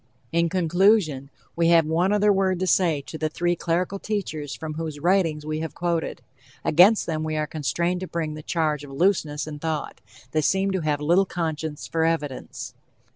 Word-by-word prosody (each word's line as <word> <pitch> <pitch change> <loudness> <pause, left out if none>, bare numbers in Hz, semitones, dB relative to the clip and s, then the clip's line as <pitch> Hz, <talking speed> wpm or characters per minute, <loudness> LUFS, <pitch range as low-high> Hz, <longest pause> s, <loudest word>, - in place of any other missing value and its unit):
In 170 +1 +2
conclusion, 175 -5 +2 0.3
we 170 0 +2
have 165 -2 +5
one 170 +5 +1
other 210 0 +4
word 190 -2 +1
to - - +2
say 170 -5 +2
to 160 - -8
the 155 - 0
three 175 +2 0
clerical 175 +4 -1
teachers 160 -10 -3
from 155 -1 -6
whose 155 -2 -5
writings 165 -3 +1
we 155 0 -2
have 160 -1 -5
quoted. 170 -1 -2 0.4
Against 185 +8 +5
them 155 -2 -2
we 155 0 -2
are 155 - 0
constrained 170 +4 -1
to 185 - -5
bring 160 -3 -3
the 155 - -7
charge 155 -2 -1
of 145 - -10
looseness 155 -1 +1
in 150 -1 -7
thought. 160 -1 -4 0.3
They 155 - +1
seem 190 +5 +1
to 190 -2 -1
have 150 -2 -1
little 175 +6 +3
conscience 160 -3 -3
for 165 -1 -1
evidence. 155 -5 -3
165 Hz, 185 wpm, -24 LUFS, 155-180 Hz, 0.4 s, have